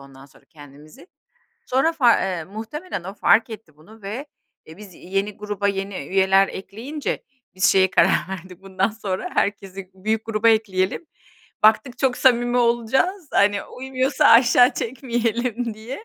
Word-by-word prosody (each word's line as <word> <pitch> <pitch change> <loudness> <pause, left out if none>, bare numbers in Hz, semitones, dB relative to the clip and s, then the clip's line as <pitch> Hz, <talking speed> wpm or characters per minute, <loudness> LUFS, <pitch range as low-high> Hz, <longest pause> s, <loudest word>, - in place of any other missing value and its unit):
ondan 135 0 -15
sonra - - -23
kendimizi. 145 - -16 0.6
Sonra 270 +6 +1
far 210 - +2
muhtemelen 220 - -7
o 195 +2 -7
fark 225 +3 +3
etti 205 -9 -11
bunu 210 +8 -18
ve, 220 +9 -6 0.4
e, 160 - -12
biz 200 -3 -13
yeni 195 +4 -4
gruba 205 -1 -3
yeni 195 0 -3
üyeler 190 0 +3
ekleyince 230 +11 -6 0.3
biz 185 - -2
şeye 190 -1 +4
karar - - +3
verdik, 185 0 -9
"Bundan 195 +2 -1
sonra 205 -4 -5
herkesi 195 -2 -3
büyük 215 +3 -2
gruba 225 0 +1
ekleyelim." 215 - 0 0.6
Baktık 240 +4 +3
çok 260 -2 +1
samimi 245 -1 +2
olacağız, 245 - 0
hani 200 0 +2
uymuyorsa 265 +3 -2
aşağı 245 +2 +6
çekmeyelim 240 -1 -2
diye. 245 - -9
215 Hz, 140 wpm, -22 LUFS, 190-245 Hz, 0.6 s, aşağı